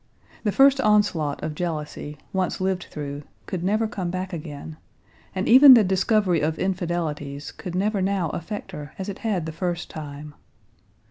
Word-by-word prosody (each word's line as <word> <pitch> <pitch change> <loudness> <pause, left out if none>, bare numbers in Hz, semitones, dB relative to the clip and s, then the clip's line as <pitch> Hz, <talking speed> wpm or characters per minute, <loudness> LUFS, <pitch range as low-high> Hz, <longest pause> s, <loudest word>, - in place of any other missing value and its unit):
The 210 - +1
first 275 +3 +5
onslaught 205 - +2
of 155 0 -2
jealousy, 150 -2 -4 0.2
once 190 0 -1
lived 190 -1 -1
through, 145 -1 -5 0.2
could 180 -2 -4
never 215 +4 +1
come 195 -6 -4
back 185 +2 -4
again, 155 -1 -7 0.6
and 190 +1 -1
even 260 +2 +10
the 225 - +6
discovery 190 -2 +2
of 155 +1 0
infidelities 165 -6 -3
could 180 -1 -7
never 200 +1 0
now 190 -3 0
affect 205 +6 -6
her 145 -1 -8
as 190 +1 -5
it 200 - -6
had 200 -8 -1
the 160 - -4
first 175 +1 -3
time. 150 -1 -8
180 Hz, 160 wpm, -24 LUFS, 155-200 Hz, 0.6 s, even